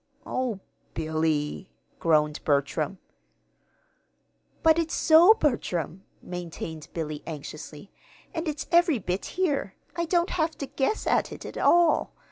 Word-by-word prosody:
"Oh, 250 -6 -2 0.4
Billy!" 155 +1 -1 0.3
groaned 150 -2 +2
Bertram. 145 +4 0 1.7
"But 320 0 +5
it's 325 -1 -1
so, 340 +7 +7
Bertram," 190 - -1 0.2
maintained 165 -3 -6
Billy, 155 -3 -4
anxiously. 155 +2 -8 0.4
"And 325 +1 -3
it's 305 0 -3
every 340 -4 +5
bit 185 -2 -3
here. 290 - 0 0.2
I 340 - 0
don't 345 +1 +1
have 320 -1 0
to 280 - -4
guess 275 +10 -1
at - - +1
it - - -8
at - - -8
all. 345 -1 +4
195 Hz, 120 wpm, -27 LUFS, -, 1.7 s, so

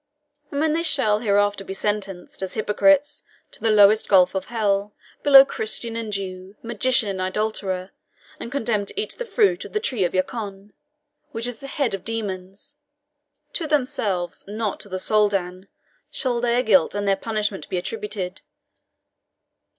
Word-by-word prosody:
And 280 - -3
when 310 0 +2
they 330 - +1
shall 265 -10 +2
hereafter 205 -2 +1
be 195 - -6
sentenced, 195 -3 -3
as 190 - -4
hypocrites, 290 +7 +2 0.3
to - - -10
the 225 - +2
lowest 215 0 +5
gulf 185 -3 +5
of 190 -1 -2
hell, 205 -3 -1 0.3
below 275 -1 +9
Christian 230 -1 -3
and 225 -2 -4
Jew, 190 -1 -5
magician 235 0 +1
and 190 -2 -3
idolater, 190 -1 -2 0.5
and 235 - -6
condemned 225 -7 -1
to - - -4
eat 430 - -2
the - - -3
fruit 415 -6 +2
of - - -11
the 425 - +1
tree 255 - -2
Yacoun, 195 +2 -2 0.6
which 230 0 -2
is 245 -2 -4
the 275 - -8
heads 275 -4 -1
of 195 - -4
demons, 200 +3 -5 0.8
to 325 - -2
themselves, 235 - -1
not 210 0 -3
to 205 - -11
the 185 - -3
Soldan, 195 -2 0 0.4
shall 245 -3 -1
their 240 +1 +2
guilt 190 -5 +3
and 205 0 -2
their 195 - +4
punishment 210 -1 -3
be 185 - -1
attributed. 190 -1 -4
210 Hz, 160 wpm, -23 LUFS, 195-240 Hz, 0.8 s, below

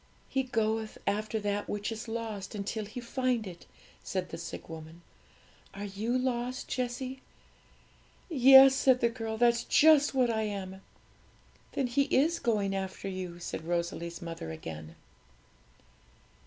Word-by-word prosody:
'"He 265 - +1
goeth 220 -3 -1
after 215 +2 -1
that 205 0 -2
which 205 +2 -2
is 225 +1 -6
lost 225 -3 -5
until 210 +1 -3
He 215 +4 -7
find 245 -1 -1
it,"' 175 -3 -10 0.4
said 185 -2 -3
the 165 - -6
sick 165 - -7
woman. 160 +1 -10 0.7
'Are 200 +1 -5
you 215 +5 -1
lost, 255 0 -2
Jessie?' 255 +1 -3 1.1
'Yes,' 270 -3 +8
said 260 -1 +4
the 235 - +3
girl; 225 -2 -4
'that's 235 0 +3
just 295 -1 +5
what 250 -3 +3
I 220 -1 0
am!' 195 -3 -4 0.9
'Then 275 - 0
He 255 +3 +2
is 305 +5 +2
going 205 -4 0
after 190 0 -4
you,' 185 -2 -5
said 175 -2 -5
Rosalie's 170 0 -2
mother 165 - -6
again. 80 0 -8
220 Hz, 140 wpm, -30 LUFS, 190-250 Hz, 1.1 s, Yes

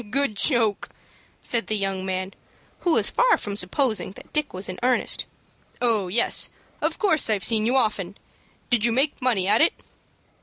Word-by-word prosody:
"Good 275 -2 +1
joke!" 225 -2 +1 0.5
said 235 -1 0
the 215 - 0
young 195 -1 -2
man, 190 0 -4 0.5
who 345 - +1
was - - +3
far - - +3
from 205 -1 -5
supposing 205 0 0
that - - -15
Dick 300 -1 -1
was 185 +2 -2
in 185 - -6
earnest. 250 0 +1 0.5
"Oh, 225 -6 0
yes, 225 +7 +1 0.3
of - - -1
course 320 - +2
I've 210 -3 0
seen 220 -1 +3
you 255 +3 +2
often! 205 -5 -1 0.5
Did 240 -3 +2
you 235 - +3
make 270 +5 0
money 225 -8 +1
at 205 - +4
it?" 325 - +4
220 Hz, 175 wpm, -23 LUFS, 195-255 Hz, 0.5 s, at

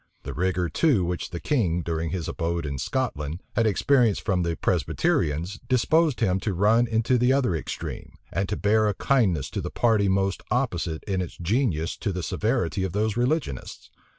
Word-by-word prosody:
The - - -5
rigor, 90 -1 0
too, 120 - +2
which 90 0 -3
the 85 - -5
king, 90 - 0
during 80 0 -2
his 85 0 -3
abode 85 -1 -2
in 70 -2 -4
Scotland, 80 - -2
had 115 -1 +3
experienced 115 +1 +2
from 95 -4 +1
the 85 -1 -1
Presbyterians, 85 +8 0
disposed 145 +3 +2
him 95 -3 +2
to 95 -1 -2
run 110 +6 +4
into 115 +2 +1
the 125 +2 +3
other 130 -10 +2
extreme, 80 - -6 0.2
and 95 +1 -1
to - - -2
bear 110 +1 +3
a 105 - 0
kindness 95 - +2
to - - -3
the - - -4
party 110 -4 +2
most 95 0 0
opposite 90 -10 -1
in 95 -3 -1
its 90 - -6
genius 90 - 0
to 105 - -2
the 90 -1 -4
severity 105 -4 -1
of 95 - -3
those 105 +1 0
religionists. 125 - -2
100 Hz, 180 wpm, -25 LUFS, 85-120 Hz, 0.2 s, run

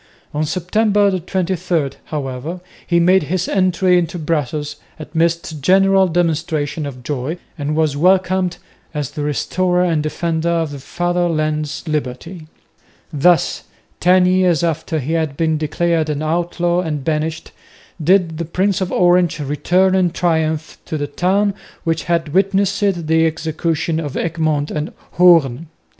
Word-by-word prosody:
On 150 +1 0
September 200 +4 +1
23, 175 -4 -1
however, 145 +3 -5 0.3
he 170 -1 +3
made 185 +3 +4
his 180 +4 -2
entry 185 -1 +2
into 170 0 -3
Brussels 150 -2 -2 0.2
amidst 160 0 -2
general 195 +3 +4
demonstrations 160 -3 -1
of 125 -3 -9
joy 145 +4 -3 0.2
and 150 -2 -3
was 155 -3 +1
welcomed 185 +2 +2 0.4
as 145 -3 -3
"the 150 - -5
Restorer 180 +6 0
and 165 -4 +1
Defender 160 +2 -1
of 165 -3 0
the 140 - -7
Father 175 +4 -1
land's 155 0 -2
liberty." 155 +3 -4 0.7
Thus, 165 +4 +2 0.3
ten 180 +1 +4
years 180 -3 +3
after 160 -1 -1
he 150 +2 -2
had 160 -4 -1
been 160 -2 +1
declared 160 +1 0
an 150 0 -2
outlaw 175 +2 0
and 150 -5 -3
banished, 155 +2 -2 0.5
did 170 -1 +2
the 170 - -2
Prince 190 +4 0
of 185 - -2
Orange 175 -2 +3
return 175 +6 +1
in 185 -2 +3
triumph 160 -3 -1
to 155 - -3
the 145 - -2
town 195 +6 +1 0.3
which 165 -1 -1
had 165 -3 -1
witnessed 195 +1 +2 0.3
the 160 +1 +3
execution 160 0 -2
of 145 -4 -4
Egmont 155 -3 -1
and 150 0 -3 0.2
Hoorn. 165 -5 +4
165 Hz, 140 wpm, -18 LUFS, 155-180 Hz, 0.7 s, made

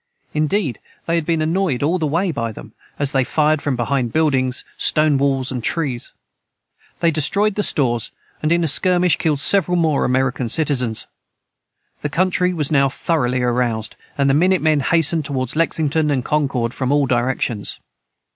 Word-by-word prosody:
Indeed, 155 - -1 0.3
they 165 - -2
had 165 -2 -1
been 165 -2 +1
annoyed 160 -5 -1
all 170 +5 +1
the 155 - 0
way 170 +5 0
by 115 -6 -3
them, - - -12 0.2
as 145 -1 0
they 135 -2 +2
fired 155 +2 +1
from 140 -3 -1
behind 125 0 -1
buildings, 130 -4 0
stone 150 -3 +2
walls, 135 -2 0
and 125 -3 -4
trees. 135 -7 -2 0.9
They 170 - +3
destroyed 195 +8 +2
the 210 - -1
stores, 120 - +1 0.3
and 155 - 0
in 170 0 +2
a - - +1
skirmish 180 +1 +3
killed 150 -3 0
several 180 +3 +3
more 160 -4 +1
American 130 -1 0
citizens. 125 -6 +1 1.0
The 150 - -2
country 180 +3 +1
was 155 -5 -1
now 140 -2 +3
thoroughly 130 -4 -1
aroused, 120 -3 -1 0.2
and 140 -1 +2
the 135 - +3
minute 180 +3 +2
men 155 -2 +3
hastened 165 +2 +2
toward 130 -3 -3
Lexington 155 -1 0
and 135 -3 -1
Concord 135 -6 -1
from 130 0 -2
all 145 -1 +3
directions. 120 -4 -2
145 Hz, 165 wpm, -19 LUFS, 130-165 Hz, 1.0 s, They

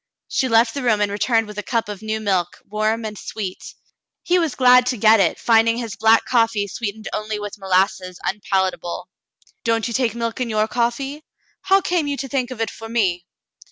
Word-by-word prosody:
She 265 - 0
left 225 0 +4
the 280 - -3
room 225 -4 +2
and 205 -1 +1
returned 225 +2 +1
with 210 0 -7
a - - -1
cup 230 0 -1
of 205 -1 -7
new 220 0 -2
milk, 190 -5 -1
warm 215 +2 -1
and 215 -1 -5
sweet. 200 -2 -7 0.5
He 360 +1 +2
was 325 -6 -1
glad 250 -1 +6
to 250 - 0
get 220 +1 +5
it, 175 -4 +2
finding 230 0 +3
his 230 -4 -5
black 225 0 +4
coffee 225 -4 +1
sweetened 215 +1 -5
only 215 0 -3
with 205 0 -7
molasses 185 -1 0
unpalatable. 190 -3 -2 0.5
"Don't 230 0 +1
you 235 - -4
take 235 -2 0
milk 230 +1 -3
in 245 - -1
your 215 0 +1
coffee.'^ 245 +5 -2 0.4
How 390 +1 +3
came 350 -4 0
you 285 -1 -2
to 270 - -4
think 260 -2 -1
of 255 -3 -8
it 225 -1 -1
for 225 0 -10
me 180 -7 0
225 Hz, 200 wpm, -21 LUFS, 205-245 Hz, 0.5 s, glad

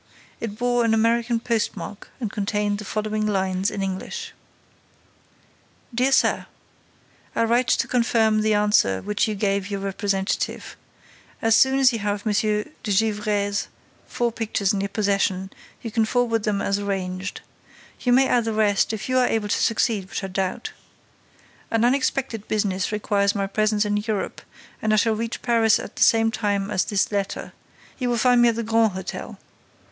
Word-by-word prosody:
It 215 -2 -5
bore 245 0 +1
an 225 -1 +3
American 230 +1 +2
postmark 225 -3 -3
and 225 -5 -3
contained 205 0 -1
the 210 - -7
following 215 +1 -2
lines, 190 -1 0
in 200 - -4
English: 195 - -5 1.6
DEAR 255 +3 +2
SIR: 265 - +2 0.9
I 230 - +2
write 240 +2 +2
to - - +2
confirm 225 -3 +2
the 215 0 +2
answer 205 - +2
which 210 +1 0
I - - -1
gave 200 -1 -1
your 200 -1 -3
representative. 195 0 -2 0.6
As 225 -1 +3
soon 265 +2 +4
as 265 -2 +5
you 230 - -2
have 205 0 -2
M. 215 - +1
de 210 +4 0 0.2
Gesvres's 205 -1 0 0.4
four 240 -1 -1
pictures 215 -3 -1
in 195 - -1
your 200 - -2
possession, 195 -2 0 0.3
you 230 - -5
can 225 0 +2
forward 230 -2 0
them 200 -2 0
as 200 0 0
arranged. 190 -1 -3 0.6
You 245 - 0
may 265 +2 +5
add 240 -2 +2
the 225 - -1
rest, 210 0 +2
if 205 -3 -4
you 255 0 +2
are 250 - +3
able 215 -2 -1
to - - +1
succeed, 215 -4 +1
which - - -4
I - - -2
doubt. 190 0 -3 1.0
An 225 +1 +2
unexpected 255 -3 0
business 200 -3 -1
requires 205 -1 +1
my 200 -1 0
presence 215 +1 +1
in 205 0 0
Europe 210 -1 -3 0.4
and 215 0 +1
I - - +5
shall 220 +1 +3
reach 230 +1 -4
Paris 225 -2 +4
at - - -8
the - - -7
same 225 0 +5
time 205 -2 -1
as 190 -3 +1
this 200 -1 0
letter. 200 -2 -3 0.5
You 250 -2 -1
will 240 - +1
find 245 +1 +4
me 240 - +6
at 230 - -1
the 230 - -2
Grand 225 -2 +2
Hôtel. 190 0 -6
215 Hz, 175 wpm, -23 LUFS, 200-230 Hz, 1.6 s, me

